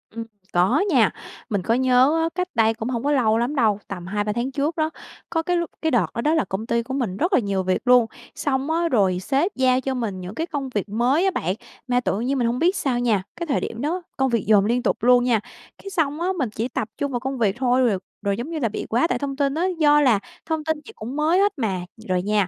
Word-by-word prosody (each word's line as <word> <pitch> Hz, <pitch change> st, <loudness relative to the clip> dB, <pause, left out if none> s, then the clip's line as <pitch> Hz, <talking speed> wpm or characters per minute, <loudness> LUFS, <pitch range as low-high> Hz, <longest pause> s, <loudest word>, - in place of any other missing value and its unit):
Ừm, 230 Hz, -, -3 dB, 0.3 s
có 185 Hz, +11 st, +3 dB
nha. 240 Hz, -, +4 dB, 0.4 s
Mình 200 Hz, -3 st, 0 dB
có 225 Hz, -, +1 dB
nhớ 255 Hz, +3 st, +4 dB
á, 325 Hz, -, +1 dB
cách 365 Hz, 0 st, -1 dB
đây 225 Hz, -1 st, +4 dB
cũng 225 Hz, +1 st, -5 dB
hông 235 Hz, -2 st, -2 dB
có 290 Hz, -, +1 dB
lâu 225 Hz, -6 st, +3 dB
lắm 240 Hz, +6 st, -1 dB
đâu, 220 Hz, -6 st, +2 dB
tầm 180 Hz, -3 st, -7 dB
2-3 205 Hz, +2 st, -1 dB
tháng 240 Hz, +3 st, -2 dB
trước 295 Hz, +4 st, -1 dB
đó, 315 Hz, 0 st, +1 dB, 0.4 s
có 325 Hz, -1 st, 0 dB
cái 355 Hz, +1 st, +1 dB
lúc 340 Hz, -1 st, -2 dB
cái 320 Hz, -1 st, +1 dB
đợt 230 Hz, -7 st, +3 dB
đó 235 Hz, -, -2 dB
đó 305 Hz, +5 st, +2 dB
là 320 Hz, -, +2 dB
công 190 Hz, +4 st, -4 dB
ty 235 Hz, 0 st, 0 dB
của 265 Hz, +2 st, -6 dB
mình 225 Hz, -9 st, -2 dB
rất 355 Hz, +4 st, 0 dB
là -, -, +6 dB
nhiều 200 Hz, -4 st, -1 dB
việc 185 Hz, 0 st, 0 dB
luôn, 250 Hz, -1 st, +6 dB, 0.3 s
xong 275 Hz, +1 st, -1 dB
á, 335 Hz, +1 st, +1 dB
rồi 190 Hz, -, +2 dB
sếp 285 Hz, -, 0 dB
giao 260 Hz, 0 st, +3 dB
cho 270 Hz, -, -2 dB
mình 220 Hz, -7 st, -3 dB
những 185 Hz, +4 st, -7 dB
cái 325 Hz, +2 st, -2 dB
công 275 Hz, -5 st, -4 dB
việc 210 Hz, -3 st, -3 dB
mới 250 Hz, -, +2 dB
á 385 Hz, -, +3 dB
bạn. 185 Hz, -, -1 dB, 0.3 s
Mà 245 Hz, 0 st, +2 dB
tự 215 Hz, -4 st, -1 dB
nhiên 265 Hz, +4 st, 0 dB
mình 240 Hz, -2 st, +1 dB
hông 240 Hz, +2 st, -1 dB
biết 360 Hz, +4 st, +3 dB
sao 260 Hz, -8 st, 0 dB
nha, 220 Hz, -6 st, +1 dB
cái 340 Hz, -1 st, -5 dB
thời 275 Hz, -, +1 dB
điểm 230 Hz, +2 st, -5 dB
đó 340 Hz, +5 st, -1 dB, 0.2 s
công 265 Hz, 0 st, +2 dB
việc 230 Hz, -3 st, 0 dB
dồn 205 Hz, -2 st, +5 dB
liên 240 Hz, +2 st, +1 dB
tục -, -, -1 dB
luôn 245 Hz, 0 st, +5 dB
nha. 240 Hz, -3 st, +2 dB, 0.4 s
Cái 395 Hz, -, -9 dB
xong 315 Hz, -4 st, -1 dB
á, 350 Hz, -, 0 dB
mình 265 Hz, -8 st, 0 dB
chỉ 220 Hz, +3 st, -3 dB
tập 225 Hz, -3 st, -3 dB
trung 285 Hz, -1 st, -2 dB
vào 245 Hz, -, -1 dB
công 265 Hz, +2 st, -4 dB
việc 215 Hz, -4 st, +1 dB
thôi, 255 Hz, 0 st, +2 dB
rồi 220 Hz, -6 st, +3 dB, 0.2 s
rồi 200 Hz, -1 st, -1 dB
giống 245 Hz, +6 st, -5 dB
như 330 Hz, -2 st, -3 dB
là 235 Hz, -5 st, 0 dB
bị 210 Hz, -, -5 dB
quá 240 Hz, +8 st, +2 dB
tải -, -, -1 dB
thông 280 Hz, -1 st, -3 dB
tin 280 Hz, -1 st, 0 dB
á, 325 Hz, +4 st, -1 dB, 0.2 s
do 295 Hz, -1 st, +5 dB
là 245 Hz, -8 st, +4 dB, 0.3 s
thông 320 Hz, -1 st, -2 dB
tin 315 Hz, 0 st, -1 dB
gì -, -, -10 dB
cũng 240 Hz, +5 st, -7 dB
mới 315 Hz, +5 st, +2 dB
hết 405 Hz, +1 st, +3 dB
mà. 195 Hz, -8 st, -1 dB, 0.3 s
Rồi 180 Hz, -1 st, +1 dB
nha, 205 Hz, -2 st, +1 dB
250 Hz, 275 wpm, -23 LUFS, 220-295 Hz, 0.4 s, là